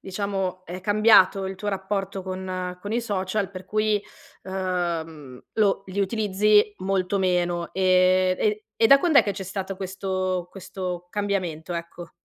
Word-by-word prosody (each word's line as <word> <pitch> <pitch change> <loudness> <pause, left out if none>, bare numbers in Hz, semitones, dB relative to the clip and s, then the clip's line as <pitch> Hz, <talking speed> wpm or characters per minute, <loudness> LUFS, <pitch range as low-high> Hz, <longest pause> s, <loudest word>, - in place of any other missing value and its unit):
diciamo 190 -1 -3
è 180 +2 -7
cambiato 205 -1 +5
il 190 0 -5
tuo 205 +2 -4
rapporto 195 0 -3
con 185 -1 -5
con 205 +2 -6
i 235 - +1
social 195 -2 -2
per 185 -1 -9
cui, 215 0 +1 0.4
ehm, 170 -7 -3
lo 200 -2 +2
li 190 +1 -3
utilizzi 210 0 +3
molto 190 +1 0
meno. 175 -2 0
Ehm, 185 0 +3
e 210 0 0 0.2
e 225 - +7
da 275 +3 +8
quand'è 315 -3 +5
che 200 - -2
c'è 195 - -6
stato 190 0 -5
questo 185 -1 -3
questo 180 -2 -6
cambiamento? 180 -5 -2
Ecco. 170 0 -7
190 Hz, 145 wpm, -24 LUFS, 185-200 Hz, 0.4 s, da